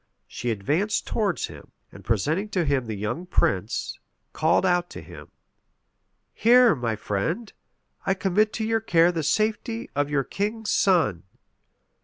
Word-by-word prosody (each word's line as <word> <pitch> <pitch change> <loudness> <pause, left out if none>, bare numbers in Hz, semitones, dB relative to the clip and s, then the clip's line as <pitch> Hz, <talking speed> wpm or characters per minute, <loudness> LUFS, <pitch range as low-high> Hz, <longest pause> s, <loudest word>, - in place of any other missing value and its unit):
She 120 - -4
advanced 145 - 0
towards 205 -6 -1
him; - - -12 0.2
and - - -13
presenting 150 - 0
to 185 -4 0
him 135 -4 0
the 110 - -3
young 105 - -4
prince, 105 - -1 0.3
called 160 +4 +2
out 175 -1 +1
to - - -9
him, - - -12 1.1
"Here, 245 0 +6
my 120 -5 -2
friend, 160 - -3 0.5
I 195 0 +1
commit 200 +3 +1
to 220 - -2
your 225 0 +1
care 170 -4 +4
the 165 -2 -2
safety 220 - -1
of 145 0 0
your 145 -2 +1
king's 210 - -3
son." 160 - +2
175 Hz, 145 wpm, -25 LUFS, 135-215 Hz, 1.1 s, Here